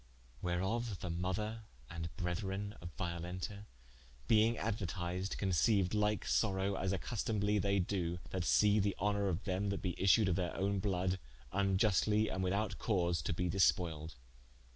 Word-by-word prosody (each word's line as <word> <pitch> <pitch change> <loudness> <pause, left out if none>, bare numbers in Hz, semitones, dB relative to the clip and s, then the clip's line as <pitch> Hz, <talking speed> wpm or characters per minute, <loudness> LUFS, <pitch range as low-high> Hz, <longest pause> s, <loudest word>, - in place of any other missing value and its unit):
Wherof 95 +5 -1
the 90 - -4
mother 105 +6 -2 0.2
and 80 +3 -5
brethren 95 +3 -2
of 85 - -6
Violenta 90 +4 -4 0.6
being 110 +1 +4
aduertised, 95 -3 -2
conceiued 95 +1 +2
like 105 -2 +1
sorowe, 95 +10 +1
as 95 -1 -1
accustomably 105 +1 0
they 100 +1 +2
doe, 90 -2 -1
that 95 -2 -1
see 105 +3 +4
the 100 -1 +1
honor 100 0 +1
of 95 +1 -1
them 100 +1 -1
that 100 - -3
be 90 -2 -1
issued 100 +2 +5
of 90 - +2
their 90 -3 -2
owne 100 +2 0
bloud 95 -1 0 0.3
vniustly 105 +2 +2
and 95 0 -1
without 100 +4 -1
cause 85 -6 +1
to 75 - -2
be 90 +2 0
dispoiled. 80 -4 +1
95 Hz, 145 wpm, -35 LUFS, 90-105 Hz, 0.6 s, issued